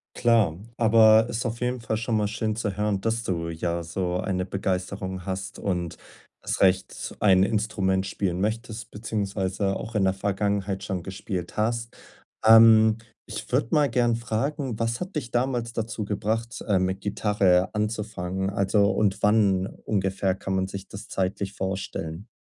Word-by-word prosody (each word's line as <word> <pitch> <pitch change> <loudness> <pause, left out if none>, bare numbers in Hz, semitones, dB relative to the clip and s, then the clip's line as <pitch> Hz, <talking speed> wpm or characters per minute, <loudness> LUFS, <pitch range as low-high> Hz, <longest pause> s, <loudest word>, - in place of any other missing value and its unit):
Klar, 110 -9 +3 0.2
aber 110 0 +6
ist 115 +2 -2
auf 115 0 -3
jeden 125 0 -1
Fall 110 -1 -2
schon 110 0 0
mal 105 -1 +1
schön 110 0 -2
zu 105 -4 -2
hören, 105 -1 0
dass 115 +1 -1
du 85 -4 -2
ja 85 +1 -2
so 90 +1 -2
eine 90 -1 -1
Begeisterung 95 0 -3
hast 95 0 -4
und 90 -4 -2 0.4
erst - - -2
recht 95 -1 +1
ein 95 -2 +5
Instrument 100 -3 0
spielen 95 -2 -2
möchtest, 110 +2 -3
beziehungsweise 100 -2 -2
auch 115 - -6
in 100 -2 +3
der 95 - +3
Vergangenheit 100 0 -1
schon 95 -4 -3
gespielt 95 -2 -5
hast. 115 +2 -1 0.5
Ähm, 110 -1 +8 0.3
ich - - -7
würde 115 - +2
mal 145 -2 +4
gerne 120 -2 +2
fragen: 120 +2 -2
Was 115 +4 -1
hat 185 -1 -5
dich 130 -5 -3
damals 120 -2 -1
dazu 110 -1 -3
gebracht, 110 +3 -2
äh, 100 -4 +3
mit 95 +1 -1
Gitarre 100 -3 +2
anzufangen? 105 -3 -2
Also, 100 +1 +2
und 100 -3 +1
wann 100 -3 +3
ungefähr 95 -3 -1
kann 95 0 -3
man 95 0 0
sich 95 0 -7
das 100 - -10
zeitlich 95 +1 -2
vorstellen? 95 -1 -4
100 Hz, 160 wpm, -25 LUFS, 95-110 Hz, 0.5 s, Ähm